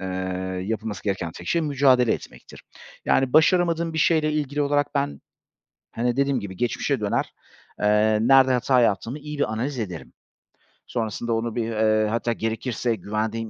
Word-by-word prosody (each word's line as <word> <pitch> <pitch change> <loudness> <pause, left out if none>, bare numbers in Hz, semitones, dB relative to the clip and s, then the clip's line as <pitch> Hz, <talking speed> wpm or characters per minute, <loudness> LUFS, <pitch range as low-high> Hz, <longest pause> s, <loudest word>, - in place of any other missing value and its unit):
eee, 95 - -5 0.6
yapılması 110 0 -4
gereken 95 -5 -2
tek 85 - -11
şey 170 - +2
mücadele 135 -5 +3
etmektir. - - -9 0.4
Yani, 135 -1 +2
başaramadığım 170 +1 +3
bir 160 - -3
şeyle 155 -1 +2
ilgili 145 -1 -1
olarak 145 +1 0
ben, 105 - -1 0.7
hani, 120 +2 -1
dediğim 140 -2 +1
gibi 95 -4 -8
geçmişe 125 +2 -1
döner, 105 -1 -1 0.5
eee, 105 +1 +3
nerede 130 +1 +5
hata 125 0 +3
yaptığımı 115 +5 0
iyi 150 0 -7
bir 110 -6 0
analiz 125 +3 -3
ederim. 90 -7 -6 0.8
Sonrasında 115 0 -2
onu 115 0 -2
bir, 120 - 0
eee, 110 -1 +2
hatta 115 +1 -1
gerekirse 115 +1 -2
güvendiğim 110 +3 -3
120 Hz, 150 wpm, -24 LUFS, 110-140 Hz, 0.8 s, nerede